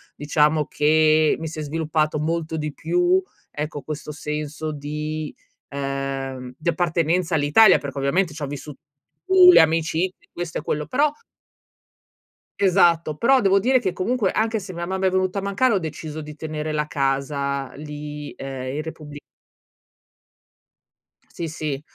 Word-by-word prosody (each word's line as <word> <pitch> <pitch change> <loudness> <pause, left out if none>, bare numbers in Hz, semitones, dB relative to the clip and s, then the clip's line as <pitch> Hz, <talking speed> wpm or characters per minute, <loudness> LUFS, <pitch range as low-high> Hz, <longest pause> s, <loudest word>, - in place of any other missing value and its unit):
diciamo 150 +1 +2
che 155 +1 +3
mi 160 - -4
si 155 0 -7
è - - -2
sviluppato 155 0 -1
molto 160 +1 -2
di 150 -1 -3
più, 175 +4 +2 0.3
ecco, 150 0 -4
questo 155 +1 -6
senso 150 +1 -4
di 150 +1 -4 0.4
uhm, 135 -2 -4
di 160 - -1
appartenenza 170 0 0
all'Italia, 155 +8 +6
perché, 140 -1 -7
ovviamente, 160 +5 +1
c'ho 150 -2 -4
vissu 145 +1 -7 0.5
pu 375 -1 +8
le - - +8
amicizie 165 +3 0
questo 175 -1 -4
e - - -7
quello, 150 -2 -2
però 290 - +2 1.5
Esatto, 175 -5 +3
però 265 +2 +4
devo 195 -1 +4
dire 255 +5 +3
che, 185 -7 -2
comunque, 210 +3 0
anche 220 0 0
se 185 -1 -8
mia 170 0 -4
mamma 190 +1 0
è - - +4
venuta 185 +1 0
a - - -4
mancare, 200 +6 +1
ho 200 - +2
deciso 155 -1 -6
di 150 0 -9
tenere 155 0 -4
la 150 0 0
casa 140 -1 -1
lì, 150 0 -7
ehm, 135 -1 -5
in 150 - -2
Repubbli 150 -2 -9 2.1
Sì, 170 - -6
sì, 150 -3 -4
155 Hz, 150 wpm, -23 LUFS, 150-180 Hz, 2.1 s, pu